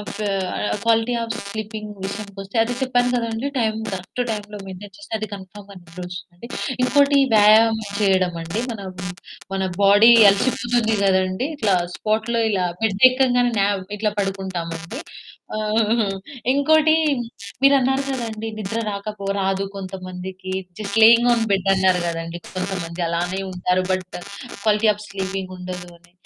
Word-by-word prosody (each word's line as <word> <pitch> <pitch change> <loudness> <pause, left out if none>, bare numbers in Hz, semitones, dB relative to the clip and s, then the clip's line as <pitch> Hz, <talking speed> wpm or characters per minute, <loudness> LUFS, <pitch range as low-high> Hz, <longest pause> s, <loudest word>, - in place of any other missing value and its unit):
Okay. 210 0 -5 0.6
Quality 230 +1 +2
of 230 0 -3
sleeping 215 0 -6
విషయానికొస్తే 200 0 -6
అది 240 +2 -2
చెప్పాను 245 -2 +2
కదండీ! 230 +2 -1
టైం 220 -2 +1 0.2
కరెక్టు 190 +6 -4
టైంలో 210 -1 -5
మెయింటైన్ 195 +1 -9
చేస్తే 305 - -14
అది 215 - -4
కన్ఫర్మ్‌గా 200 +1 -11
నిద్రొస్తుంది. 180 +3 -9 0.4
ఇంకోటి 285 +1 +4 0.2
వ్యాయామం 220 +1 +6 0.2
చేయడమండి. 185 -2 +1
మన 220 - -7 0.7
మన 190 - -1 0.2
బాడీ 205 +3 +7 0.2
అలసిపోతుంది 235 +1 +1
కదండీ! 190 +5 +1
ఇట్లా 215 -8 +2 0.2
స్పాట్‌లో 220 +2 0
ఇలా 190 -3 +1 0.2
బెడ్ 210 +2 +5
ఎక్కంగానే 245 -2 +2
నావ్ 200 -1 +1 0.2
ఇట్లా 210 0 0
పడుకుంటామండి. 190 - -4 1.5
ఇంకోటి 310 +3 +4 0.7
మీరన్నారు 270 -1 +4
కదండీ! 225 -4 -4
నిద్ర 215 +2 -3
రాకపో 200 0 -5
రాదు 195 0 0
కొంతమందికి 185 -1 -7 0.3
జస్ట్ 200 -1 -4
లేయింగ్ 235 +2 +7
ఆన్ 230 -1 +2
బెడ్ 195 -1 +1
అన్నారు 190 -1 +3
గదండీ! 165 0 -4 0.2
కొంతమంది 180 -2 -3
అలానే 175 +3 -1
ఉంటారు. 180 0 0
బట్ 185 0 -3 0.5
క్వాలిటీ 215 +1 +3
ఆఫ్ 210 0 -10
స్లీపింగుండదు 185 -2 -5
అని 175 +1 -26
200 Hz, 120 wpm, -21 LUFS, 185-225 Hz, 1.5 s, బాడీ